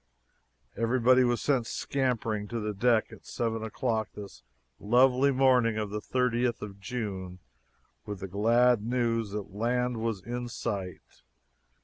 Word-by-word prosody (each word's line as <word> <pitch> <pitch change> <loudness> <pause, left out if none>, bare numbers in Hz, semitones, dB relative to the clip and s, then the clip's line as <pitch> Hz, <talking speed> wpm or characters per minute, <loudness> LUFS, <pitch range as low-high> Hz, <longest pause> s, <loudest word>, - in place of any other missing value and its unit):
Everybody 125 +2 +3
was 120 -1 0
sent 130 -5 +1
scampering 115 -7 -1
to 115 +2 -4
the 105 -1 -3
deck 115 +2 +2
at - - -14
seven 115 -1 -2
o'clock 110 0 -2
this 100 -10 -10 0.4
lovely 125 +5 +4
morning 130 -4 +3
of 105 -2 -3
the 105 0 -3
thirtieth 125 -1 0
of 100 -1 -8
June 95 -5 -5 0.7
with 105 -2 -5
the 95 - -4
glad 115 +4 +3
news 115 -2 0
that 100 -2 -6
land 125 +3 0
was 110 -4 -2
in 120 +2 -4
sight! 100 -7 -5
115 Hz, 135 wpm, -29 LUFS, 105-125 Hz, 0.7 s, lovely